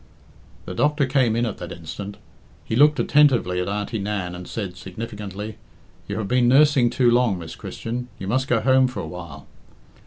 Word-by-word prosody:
The - - -6
doctor 145 +7 +2
came 130 -4 +2
in 120 +1 +1
at 110 - -4
that 85 0 -7
instant. 90 +4 -7 0.5
He - - -2
looked 150 +4 +5
attentively 125 -12 +3
at 90 - -3
Auntie 105 +2 -2
Nan, 100 -3 -3
and 90 0 -8
said 100 -5 -5
significantly, 105 +1 -7 0.5
"You 100 - -3
have 110 -3 -2
been 125 +2 +3
nursing 135 -1 +5
too 120 0 +3
long, 120 -5 +3
Miss 85 -2 -8
Christian, 120 +2 -5
you 95 - -6
must 130 +6 0
go 120 -3 +2
home 130 +2 +4
for 125 - -5
a - - -6
while." 80 -5 -9
110 Hz, 185 wpm, -23 LUFS, 95-125 Hz, 0.5 s, looked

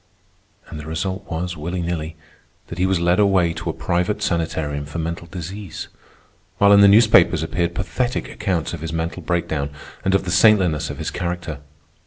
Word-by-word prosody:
And 75 - -8
the 75 - -8
result 95 +4 -4
was, 90 +2 -3
willy 85 +3 -4
nilly, 85 -2 -3 0.5
that 85 - -7
he 95 - +3
was 95 -2 +1
led 85 +2 +2
away 95 -4 +3
to - - -5
a - - -1
private 90 +4 -1
sanitarium 80 -4 -2
for 75 - -7
mental 85 +1 -4
disease, 90 +2 -7 0.7
while 100 0 +6
in 100 - +7
the 100 - +8
newspapers 100 -6 +5
appeared 85 +1 -1
pathetic 120 +5 -2
accounts 95 -8 -2
of 85 - -6
his 80 0 -4
mental 85 +2 -3
breakdown 80 -4 -1 0.3
and 95 0 +2
of 95 - +2
the 90 - -3
saintliness 90 -6 +4
of - - -6
his - - -4
character. 85 -4 -4
85 Hz, 180 wpm, -21 LUFS, 80-95 Hz, 0.7 s, the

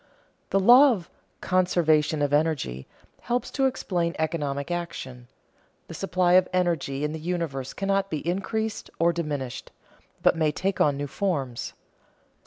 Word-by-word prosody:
The 195 - +2
law 250 +7 +7
of 185 -6 -7 0.3
"conservation 160 -5 +2
of 145 0 0
energy" 145 - 0 0.3
helps 245 +1 -2
to 270 -1 +2
explain 175 -9 -2
economic 150 -1 -2
action; 165 -8 -5 0.6
the - - -9
supply 180 -2 +1
of 185 0 +6
energy 170 -6 0
in 150 - -1
the 160 - -5
universe 155 -6 -3
cannot 195 0 0
be 155 -1 -4
increased 215 +4 -2
or 170 +1 +3
diminished, 145 -7 -4 0.5
but - - +5
may 155 -2 +1
take 185 +5 -2
on 145 -2 +3
new 145 - -3
forms. 140 -7 -3
170 Hz, 140 wpm, -26 LUFS, 145-185 Hz, 0.6 s, law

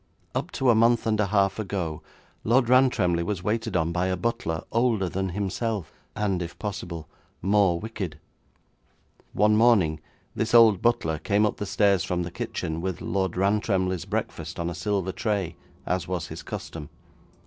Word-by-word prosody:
Up - - -2
to 130 -2 +3
a - - +5
month 115 +1 +3
and 110 -1 +1
a 105 - +2
half 100 0 +2
ago 90 -6 -3 0.4
Lord 120 +1 +3
Rantremly 125 -10 +4
was 90 0 -3
waited 110 -2 -1
on 80 0 0
by 90 +2 0
a 95 0 0
butler 90 -6 -2
older 115 -5 +2
than 95 +2 -2
himself, 100 +1 -2 0.2
and 100 -4 0
if 85 -1 -6
possible, 90 -6 -5 0.4
more 95 -3 +3
wicked. 100 -7 -5 1.2
One 105 +1 +4
morning 105 -9 +4 0.4
this 110 +1 0
old 110 -5 +7
butler 80 -10 +1
came 105 +4 +2
up 105 - -1
the 105 - -4
stairs 100 -2 +3
from 90 0 -1
the 85 - -6
kitchen, 80 -1 -4
with 95 -1 -3
Lord 95 -3 -1
Rantremly's 95 -2 +1
breakfast - - -4
on 85 0 -1
a - - -4
silver 100 -1 -1
tray, 100 -4 -2 0.3
as 90 -1 -1
was 90 -3 -3
his - - -7
custom. 75 -3 -7
95 Hz, 165 wpm, -26 LUFS, 90-110 Hz, 1.2 s, old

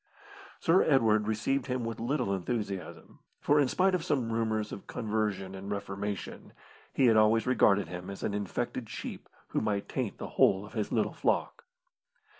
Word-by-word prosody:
Sir 170 +3 +4
Edward 110 -7 +3
received 125 +5 0
him 125 -2 -2
with 115 0 -4
little 120 -3 0
enthusiasm, 100 0 -4 0.2
for 145 +1 +3
in 140 - +4
spite 185 +8 +2
of 180 -3 0
some 130 -10 0
rumours 110 -2 -1
of - - -8
conversion 105 -4 -2
and 95 +1 -7
reformation, 100 -1 -5 0.4
he 135 - +2
had 115 -2 +5
always 110 +1 +4
regarded 100 -7 +3
him 90 +2 -7
as 100 - -7
an 100 - -1
infected 110 +3 -3
sheep - - -7 0.2
who - - 0
might 105 -2 -1
taint - - -3
the - - -6
whole 95 +1 +5
of 105 - -14
his 110 -3 -2
little - - +1
flock. - - -1
110 Hz, 170 wpm, -30 LUFS, 100-125 Hz, 0.4 s, had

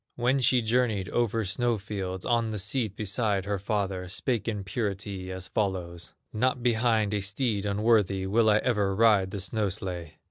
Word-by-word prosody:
When 125 +3 +1
she 125 -1 +3
journeyed 110 -5 +1
over 115 -2 0
snow 120 +4 0
fields, 95 -2 -5
On 115 -2 +1
the 110 - -3
seat 105 +1 -1
beside 100 -1 0
her 100 -1 -2
father, 95 -3 -2
Spake 115 +5 -2
in 105 -3 -2
purity 100 -2 -4
as 95 0 -5
follows: 90 -4 -3 0.2
"Not 125 +2 0
behind 110 -3 +2
a 105 - 0
steed 105 0 0
unworthy 100 -2 +2
Will 110 +3 +3
I 105 - +5
ever 105 -6 +1
ride 105 -3 +4
the 100 - -5
snow 105 +1 0
sledge!" 90 -4 -5
105 Hz, 170 wpm, -27 LUFS, 95-115 Hz, 0.2 s, I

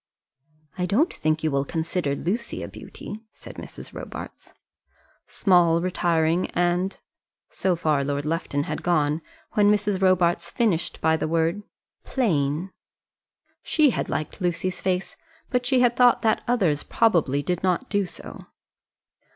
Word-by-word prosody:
"I 180 - 0
don't 260 - +2
think 155 0 -1
you 155 - +1
will 140 0 +1
consider 160 -1 -2
Lucy 220 +11 -3
a - - -5
beauty," 210 - -9
said - - -12
Mrs. - - -9
Robarts. - - -8 0.8
"Small, 175 -4 +3
retiring, 170 -1 +1
and 175 +2 +1 0.3
" - - -67
so 185 -2 0
far 155 -4 +1
Lord 145 +1 -2
Lufton 150 -3 -1
had 155 +1 -4
gone, 155 -2 +1 0.3
when 205 -1 +4
Mrs. 205 -2 +1
Robarts 175 -2 +3
finished 210 -9 0
by 160 0 +3
the - - -2
word, 165 +4 +1 0.4
"plain." 170 - 0 0.9
She 300 -4 +3
had - - -2
liked 155 +6 -4
Lucy's 180 +1 -1
face, 185 0 -1 0.4
but 250 -1 +1
she 260 -1 +3
had 245 -1 +3
thought 245 -1 +5
that 220 -1 +2
others 185 -12 +2
probably 150 -10 +2
did 180 +1 -1
not 190 +8 0
do 205 -2 +1
so. 175 - -10
175 Hz, 145 wpm, -24 LUFS, 160-205 Hz, 0.9 s, thought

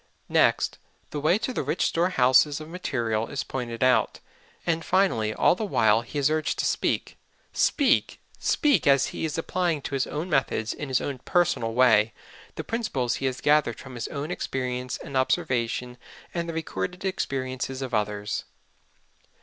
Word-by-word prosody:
Next, - - +2 0.3
the 150 - -3
way 155 +6 +3
to 240 +3 -3
the - - -1
rich 150 +4 0
storehouses 145 -4 +3
of 155 - -8
material 120 -10 -2
is 140 - -3
pointed 120 -2 -4
out. 125 -4 +3 0.5
And 165 -1 0
finally, 160 - +2
all - - +4
the 185 - -4
while 110 - +3
he 120 +5 -8
is 145 +1 +2
urged 155 0 0
to - - 0
speak, - - -1 0.3
speak, 280 -5 +2 0.2
SPEAK 295 - +2
as 140 -1 +5
he - - -3
is 155 - -3
applying 170 -1 0
to - - -5
his 135 -1 0
own 155 +4 -4
methods, 135 -8 0
in 145 - -6
his 130 -1 +1
own 140 -3 -4
personal 145 -8 +1
way, 110 -4 +5 0.4
the - - -4
principles 145 - -1
he 135 - -1
has 130 0 -3
gathered 145 -6 +3
from 135 - -10
his 120 -2 -4
own 150 +3 -5
experience 125 -5 -3
and 140 - -9
observation 125 -3 0 0.3
and 170 -1 -2
the - - -3
recorded 165 - -4
experiences 130 -6 -3
of 130 - -6
others. 105 -1 -1
135 Hz, 165 wpm, -26 LUFS, 125-165 Hz, 0.5 s, as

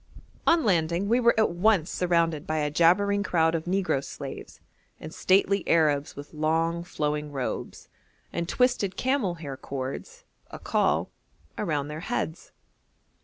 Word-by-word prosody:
On 335 -1 +5
landing 175 -2 +1
we 240 +2 +4
were 235 -2 +3
at 220 - +3
once 180 -1 +2
surrounded 165 -4 0
by 155 - -1
a 150 -1 0
jabbering 200 +6 +3
crowd 165 -5 +2
of 160 -1 -2
negro 180 -7 0
slaves, - - -8 0.4
and 155 - -9
stately 195 +1 +2
Arabs 150 -3 +2
with 145 +2 -10
long, 165 +2 0
flowing 150 -3 -3
robes 135 -3 -5 0.5
and 170 0 -3
twisted 250 -7 +1
camel 255 -9 0
hair 145 -5 -7
cords 140 - -6 0.3
(akkal) - - 0 0.5
around 150 -8 -2
their 150 +1 -5
heads. 175 -3 -4
170 Hz, 135 wpm, -26 LUFS, 155-200 Hz, 0.5 s, On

